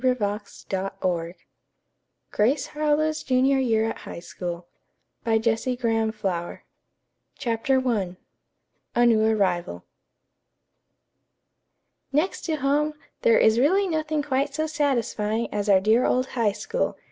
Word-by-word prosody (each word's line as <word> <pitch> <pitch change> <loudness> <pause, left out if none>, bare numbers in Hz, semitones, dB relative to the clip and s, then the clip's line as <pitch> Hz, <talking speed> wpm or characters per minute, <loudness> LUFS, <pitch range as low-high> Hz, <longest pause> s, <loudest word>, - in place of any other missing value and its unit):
CONCLUSION 210 -5 0 0.2
252 185 -3 -2 1.0
Grace 255 +7 +2
Harlowe's 305 +1 0
Junior 265 +1 +2
Year 225 -4 +2
at - - -8
High - - -8
School 175 0 -6 2.7
CHAPTER 260 +1 0
I 190 -7 -1 0.8
A 240 0 +4
NEW 225 -2 +4
ARRIVAL 185 - 0 2.3
"Next 305 +7 0
to 320 - 0
home, 295 +2 +1 0.3
there 230 - +5
is 220 +1 +4
really 380 +9 +3
nothing 310 -3 -1
quite 280 0 -1
so 310 +1 0
satisfying 235 -7 0
as 205 0 -1
our 195 -2 +6
dear 220 +5 +3
old 255 +1 +1
High 225 -5 +1
School!" 345 - -2
240 Hz, 105 wpm, -25 LUFS, 205-290 Hz, 2.7 s, our